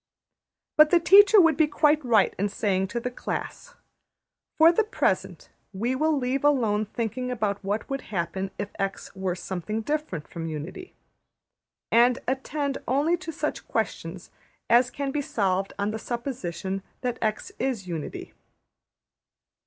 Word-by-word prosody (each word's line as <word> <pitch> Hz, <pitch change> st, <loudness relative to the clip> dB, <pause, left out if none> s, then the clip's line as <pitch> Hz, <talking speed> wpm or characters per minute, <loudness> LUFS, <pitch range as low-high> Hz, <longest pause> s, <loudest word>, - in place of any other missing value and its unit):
But 305 Hz, 0 st, +8 dB
the 350 Hz, -, +5 dB
teacher 405 Hz, +4 st, +7 dB
would 330 Hz, -4 st, +5 dB
be 315 Hz, +1 st, +3 dB
quite 300 Hz, 0 st, +3 dB
right 225 Hz, -5 st, +3 dB
in 205 Hz, +1 st, +1 dB
saying 195 Hz, -2 st, 0 dB
to 235 Hz, +5 st, -3 dB
the 250 Hz, +1 st, -4 dB
class, -, -, -5 dB, 0.8 s
``For 330 Hz, +2 st, +7 dB
the 445 Hz, -, +4 dB
present 435 Hz, -, -1 dB, 0.2 s
we 230 Hz, +7 st, -1 dB
will 310 Hz, +3 st, +1 dB
leave 260 Hz, +1 st, -1 dB
alone 225 Hz, -8 st, +2 dB
thinking 235 Hz, +3 st, -3 dB
about 210 Hz, -4 st, -2 dB
what 205 Hz, +3 st, -2 dB
would 275 Hz, -1 st, -3 dB
happen 190 Hz, 0 st, -2 dB
if 205 Hz, 0 st, -4 dB
$x$ 195 Hz, 0 st, -3 dB
were 190 Hz, -2 st, -2 dB
something 190 Hz, +4 st, -4 dB
different 290 Hz, -, -3 dB
from 165 Hz, -1 st, -6 dB
unity, 160 Hz, -, -7 dB, 1.0 s
and 240 Hz, +2 st, +5 dB
attend 275 Hz, +2 st, -2 dB
only 290 Hz, +7 st, +2 dB
to 340 Hz, -1 st, -6 dB
such -, -, -4 dB
questions -, -, -3 dB, 0.4 s
as 245 Hz, +1 st, +5 dB
can 275 Hz, 0 st, -3 dB
be 290 Hz, -, -1 dB
solved 195 Hz, -6 st, 0 dB
on 200 Hz, +1 st, -1 dB
the 220 Hz, -, -4 dB
supposition 195 Hz, -, -4 dB, 0.2 s
that 245 Hz, -1 st, -2 dB
$x$ 215 Hz, -1 st, -2 dB
is 250 Hz, -7 st, -1 dB
unity.'' 165 Hz, -4 st, -6 dB
240 Hz, 145 wpm, -26 LUFS, 195-290 Hz, 1.0 s, But